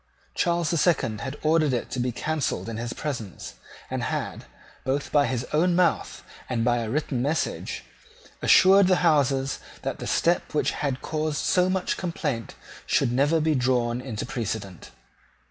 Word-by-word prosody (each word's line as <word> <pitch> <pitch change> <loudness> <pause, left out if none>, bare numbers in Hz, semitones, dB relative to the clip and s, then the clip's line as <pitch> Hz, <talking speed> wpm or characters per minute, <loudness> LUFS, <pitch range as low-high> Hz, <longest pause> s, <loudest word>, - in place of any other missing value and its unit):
Charles 170 -1 +1
the 170 - +1
Second 125 - +1
had 135 +1 -5
ordered 155 -3 +3
it 120 - -2
to 125 - -3
be 125 0 0
cancelled 155 +2 -2
in 115 -1 -4
his 120 +1 -4
presence, 120 - -5 0.3
and - - -3
had, - - -3 0.4
both 135 +2 -2
by 145 -1 +4
his 125 -2 -2
own 170 +3 +3
mouth 180 -1 +1 0.3
and 115 -3 0
by 120 0 +3
a 115 -2 -3
written 135 -1 -1
message, 150 +5 -2 0.6
assured 195 +1 +6
the 185 -1 +3
Houses 135 -4 +2 0.2
that - - -3
the - - -5
step 170 -2 +1
which 150 - +2
had 140 -3 -3
caused 155 -1 -2
so 180 0 +2
much 185 -1 -1
complaint 145 - -3 0.3
should 130 -4 +2
never 145 +6 +3
be 155 0 +2
drawn 125 -2 +1
into 120 -5 -5
precedent. 110 -7 -5
140 Hz, 165 wpm, -25 LUFS, 120-160 Hz, 0.6 s, assured